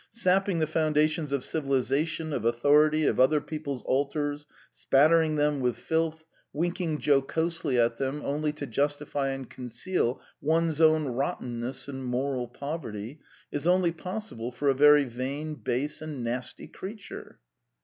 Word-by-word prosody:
Sapping 195 -4 +1
the 160 - +2
foundations 155 0 +1
of 140 -2 0
civilisation, 155 +2 -1
of 120 - -2
authority, 150 +6 +4
of - - +1
other 150 +4 +5
people's 145 -3 -5
altars, 145 +2 -1 0.3
spattering 155 +3 +4
them 150 -1 +1
with 125 -2 0
filth, 160 0 -1 0.3
winking 170 0 -1
jocosely 150 +1 +1
at 115 -1 +2
them 135 +2 -2
only 150 +2 0
to 150 -1 -5
justify 145 +2 -1
and 135 -2 -4
conceal 125 +2 -2 0.2
one's 160 +1 +1
own 155 -1 +5
rottenness 125 -2 -3
and 135 -1 -6
moral 125 0 -1
poverty 125 -2 -6 0.3
is 145 +3 -2
only 180 -1 +4
possible 180 - -6
for 140 +3 0
a - - +5
very 150 +2 +6
vain, 135 +5 -4
base, 145 0 -2
and 150 -5 -5
nasty 120 +2 -4
creature." 200 +1 -9
145 Hz, 140 wpm, -28 LUFS, 130-160 Hz, 0.3 s, very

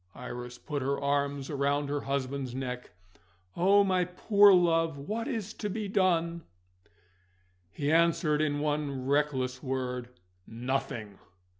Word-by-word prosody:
Iris 125 0 -7
put 145 +1 -4
her 140 +2 -1
arms 140 0 -1
round 140 0 0
her 145 0 -1
husband's 135 -2 -3
neck. 125 -1 -5 0.7
"Oh, 200 +3 +5
my 185 -2 +2
poor 200 +3 +5
love, 165 -4 +3
what 215 +12 -4
is 225 -6 -3
to 210 - -4
be 210 +1 -3
done?" 170 -4 +1 1.3
He 145 +9 -2
answered 165 -2 +3
in 145 -1 0
one 145 -3 -2
reckless 135 -3 0
word: 125 -2 -3 0.4
"Nothing!" 115 -4 -4
145 Hz, 125 wpm, -29 LUFS, 130-170 Hz, 1.3 s, Oh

